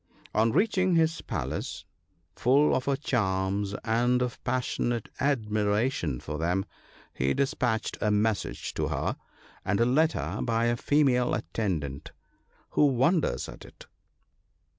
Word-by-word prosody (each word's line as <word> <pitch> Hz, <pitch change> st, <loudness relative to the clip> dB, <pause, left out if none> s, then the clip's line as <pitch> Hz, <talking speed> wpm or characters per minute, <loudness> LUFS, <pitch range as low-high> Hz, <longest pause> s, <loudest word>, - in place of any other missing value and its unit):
On 110 Hz, +1 st, +3 dB
reaching 185 Hz, -, +2 dB
his 165 Hz, 0 st, +2 dB
palace, 75 Hz, -, -4 dB, 0.5 s
full 140 Hz, +5 st, +4 dB
of 130 Hz, -, 0 dB
her 140 Hz, -, +2 dB
charms 100 Hz, -6 st, -1 dB
and 120 Hz, +3 st, +2 dB
of 125 Hz, -1 st, -5 dB
pas 130 Hz, 0 st, 0 dB
sionate 120 Hz, -2 st, -1 dB
admiration 105 Hz, -, 0 dB
for 75 Hz, 0 st, -5 dB
them, 90 Hz, +4 st, 0 dB, 0.5 s
he 65 Hz, +2 st, 0 dB
despatched 120 Hz, -5 st, -1 dB
a 105 Hz, -, +2 dB
message 105 Hz, +1 st, 0 dB
to -, -, -1 dB
her, -, -, -1 dB, 0.5 s
and 100 Hz, +1 st, 0 dB
a 115 Hz, -, +4 dB
letter, 155 Hz, +6 st, +1 dB
by 115 Hz, -1 st, +1 dB
a 120 Hz, 0 st, +2 dB
female 125 Hz, -2 st, +2 dB
attendant: 80 Hz, -7 st, -3 dB, 0.3 s
— -, -, -37 dB
who 150 Hz, -, +4 dB
wonders 140 Hz, -, +1 dB
at -, -, -10 dB
it -, -, -14 dB
115 Hz, 135 wpm, -28 LUFS, 100-135 Hz, 0.5 s, full